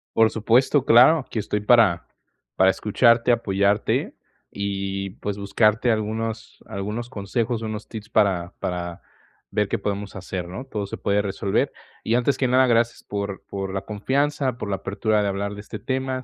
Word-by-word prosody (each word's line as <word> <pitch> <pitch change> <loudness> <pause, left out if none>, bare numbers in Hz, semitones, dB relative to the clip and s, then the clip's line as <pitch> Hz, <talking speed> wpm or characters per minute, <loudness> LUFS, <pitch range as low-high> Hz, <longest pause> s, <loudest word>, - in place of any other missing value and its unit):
Por 110 0 +5
supuesto, 120 +5 +2
claro, 130 +5 +6
que 110 - -3
estoy 105 0 -2
para 105 -6 +4 0.5
para 95 0 +5
escucharte, 115 +4 +3
apoyarte, 100 -2 +1 0.4
y, 100 -1 -3
pues, 105 -1 -3
buscarte 110 +4 +2
algunos 110 +1 -2
algunos 110 +3 -4
consejos, 115 +2 -2
unos 110 -1 -5
tips 110 -1 -8
para 95 -4 +1
para 85 -1 -4 0.5
ver 105 -1 +1
qué - - -1
podemos 100 0 -4
hacer, 90 -1 -5
¿no? 125 +9 -7
Todo 105 -6 -4
se 100 - -6
puede 100 0 +1
resolver. 100 0 -1 0.3
Y, 115 - +1
antes 125 +3 +2
que 130 - +1
nada, 130 0 +4
gracias 115 0 +1
por 100 -1 -4
por 95 -1 -4
la 95 - -2
confianza, 135 +4 -1
por 115 - -5
la 100 - 0
apertura 105 +2 0
de 100 - 0
hablar 100 +1 -3
de 105 - -8
este 105 0 -8
tema. 130 0 -2
105 Hz, 165 wpm, -23 LUFS, 100-120 Hz, 0.5 s, claro